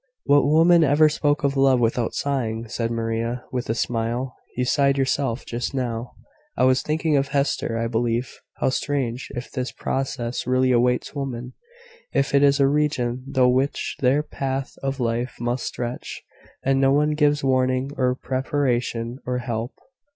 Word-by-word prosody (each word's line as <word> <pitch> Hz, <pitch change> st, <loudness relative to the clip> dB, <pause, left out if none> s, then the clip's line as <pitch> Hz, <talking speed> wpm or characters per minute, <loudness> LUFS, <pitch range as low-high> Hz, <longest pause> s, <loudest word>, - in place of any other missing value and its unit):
"What 140 Hz, 0 st, +4 dB
woman 165 Hz, +3 st, +5 dB
ever 150 Hz, +2 st, +5 dB
spoke 150 Hz, 0 st, 0 dB
of 140 Hz, 0 st, +1 dB
love 135 Hz, -2 st, +4 dB
without 115 Hz, 0 st, 0 dB
sighing?" 115 Hz, -5 st, -2 dB
said 115 Hz, +1 st, -2 dB
Maria, 115 Hz, +1 st, -2 dB
with 125 Hz, -3 st, -3 dB
a 115 Hz, -, +1 dB
smile. 120 Hz, +2 st, -2 dB, 0.2 s
"You 125 Hz, -, +1 dB
sighed 140 Hz, +1 st, +2 dB
yourself, 135 Hz, -2 st, 0 dB
just 120 Hz, +3 st, -4 dB
now." 120 Hz, -2 st, -3 dB, 0.4 s
"I -, -, +2 dB
was 130 Hz, 0 st, +4 dB
thinking 155 Hz, -1 st, +1 dB
of 135 Hz, 0 st, +1 dB
Hester, 140 Hz, -4 st, 0 dB
I 115 Hz, -, -1 dB
believe. 115 Hz, +1 st, -1 dB, 0.2 s
How -, -, 0 dB
strange, 130 Hz, -2 st, -2 dB
if 120 Hz, 0 st, -6 dB
this 130 Hz, -2 st, -3 dB
process 130 Hz, -3 st, -3 dB
really 130 Hz, 0 st, +3 dB
awaits 125 Hz, 0 st, +1 dB
women 130 Hz, -3 st, -5 dB, 0.6 s
if 140 Hz, -, +1 dB
it 140 Hz, -, +5 dB
is 140 Hz, 0 st, +4 dB
a 140 Hz, -, +5 dB
region 135 Hz, -3 st, 0 dB
through 130 Hz, -2 st, +4 dB
which 130 Hz, +3 st, 0 dB
their 135 Hz, +3 st, +3 dB
path 135 Hz, -2 st, -3 dB
of 135 Hz, 0 st, -2 dB
life 120 Hz, +1 st, -1 dB
must 120 Hz, +1 st, -2 dB
stretch 120 Hz, 0 st, -5 dB, 0.4 s
and 135 Hz, 0 st, +2 dB
no 135 Hz, 0 st, +4 dB
one 150 Hz, +2 st, +3 dB
gives 150 Hz, -1 st, +2 dB
warning, 130 Hz, 0 st, +1 dB
or 125 Hz, -1 st, +1 dB
preparation, 130 Hz, -3 st, -1 dB
or 125 Hz, 0 st, 0 dB
help!" 120 Hz, 0 st, -4 dB
130 Hz, 165 wpm, -23 LUFS, 120-140 Hz, 0.6 s, woman